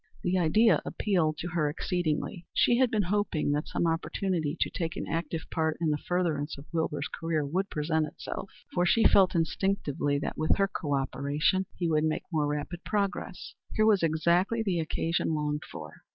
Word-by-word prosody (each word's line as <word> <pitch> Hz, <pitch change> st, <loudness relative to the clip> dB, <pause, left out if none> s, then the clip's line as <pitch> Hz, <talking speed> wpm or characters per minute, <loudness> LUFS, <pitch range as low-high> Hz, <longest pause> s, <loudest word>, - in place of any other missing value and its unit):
The 185 Hz, +1 st, +2 dB
idea 215 Hz, +7 st, +4 dB
appealed 170 Hz, -7 st, 0 dB
to 175 Hz, -, -4 dB
her 165 Hz, -4 st, +1 dB
exceedingly. 170 Hz, +2 st, -2 dB
She 240 Hz, -, +4 dB
had 260 Hz, -2 st, +4 dB
been 215 Hz, -3 st, +1 dB
hoping 180 Hz, -6 st, 0 dB
that 145 Hz, +1 st, -1 dB
some -, -, -1 dB
opportunity 165 Hz, -1 st, -1 dB
to -, -, +1 dB
take 165 Hz, -1 st, -3 dB
an -, -, -4 dB
active 165 Hz, -1 st, -2 dB
part 160 Hz, -1 st, 0 dB
in 165 Hz, -2 st, +1 dB
the 150 Hz, -, 0 dB
furtherance 165 Hz, -5 st, -1 dB
of 140 Hz, -, -10 dB
Wilbur's 160 Hz, -3 st, -1 dB
career 165 Hz, -3 st, -2 dB
would 185 Hz, +7 st, -1 dB
present 155 Hz, +1 st, 0 dB
itself, 190 Hz, -, -7 dB, 0.2 s
for 175 Hz, -, +2 dB
she 225 Hz, +6 st, +4 dB
felt 190 Hz, -4 st, +5 dB
instinctively 165 Hz, -4 st, 0 dB
that 145 Hz, -, -4 dB
with 155 Hz, -, +3 dB
her 195 Hz, -, +3 dB
co 145 Hz, -7 st, -2 dB
operation 145 Hz, +7 st, 0 dB
he 175 Hz, -, 0 dB
would 155 Hz, -1 st, +2 dB
make 155 Hz, 0 st, 0 dB
more 155 Hz, -3 st, +1 dB
rapid 150 Hz, +4 st, -4 dB
progress. 200 Hz, -2 st, -2 dB, 0.2 s
Here 215 Hz, -, +4 dB
was 210 Hz, -3 st, +4 dB
exactly 170 Hz, +7 st, +2 dB
the 185 Hz, -5 st, 0 dB
occasion 160 Hz, 0 st, -1 dB
longed 150 Hz, 0 st, -2 dB
for. 80 Hz, -3 st, -9 dB
165 Hz, 180 wpm, -29 LUFS, 150-185 Hz, 0.2 s, felt